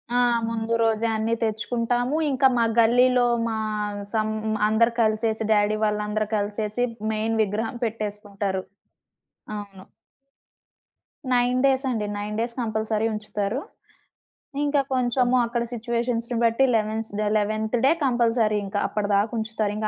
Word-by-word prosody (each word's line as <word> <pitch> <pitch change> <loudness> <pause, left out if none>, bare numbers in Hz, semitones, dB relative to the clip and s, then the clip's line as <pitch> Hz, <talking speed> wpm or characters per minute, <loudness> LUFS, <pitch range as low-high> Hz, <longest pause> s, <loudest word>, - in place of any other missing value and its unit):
ఆ! - - +4 0.3
ముందు 230 0 -2
రోజే 225 0 +2
అన్నీ 220 +1 0
తెచ్చుకుంటాము. 240 +5 0
ఇంకా 265 0 +4
మా 230 - +3
గల్లీలో 245 +2 +4 0.2
మా 225 - -2 0.6
సమ్ 215 -1 +1 0.4
అందరు 225 +2 +3
కలిసేసి 220 0 +1
డ్యాడీ 210 0 +2
వాళ్ళందరూ 210 0 -1
కలిసేసి 210 +3 -2 0.3
మెయిన్ 220 +1 -1
విగ్రహం 215 +3 -3
పెట్టేసుకుంటారు. 205 -3 -3 1.0
అవును. 195 -2 -9 1.5
9 245 +1 +2
డేస్ 270 0 +3
అండి. 225 -4 -1
9 210 +1 -4
డేస్ 235 +1 -2
కంపల్సరీ 220 -1 -1
ఉంచుతారు. 210 +2 -3 1.0
ఇంకా 290 -1 +2
కొంచెము 250 0 +2
అక్కడ 235 0 -1
సిట్యుయేషన్స్‌ని 235 0 -2
బట్టి 230 +3 +3
లెవెన్స్ 220 0 -1 0.3
11థ్ 215 +2 -1
డే 275 - +6
కంపల్సరీ 230 -4 +2
ఇంకా. 200 +1 -2
అప్పటిదాకుంచుతారింకా. 215 +1 -1
220 Hz, 110 wpm, -24 LUFS, 210-235 Hz, 1.5 s, డే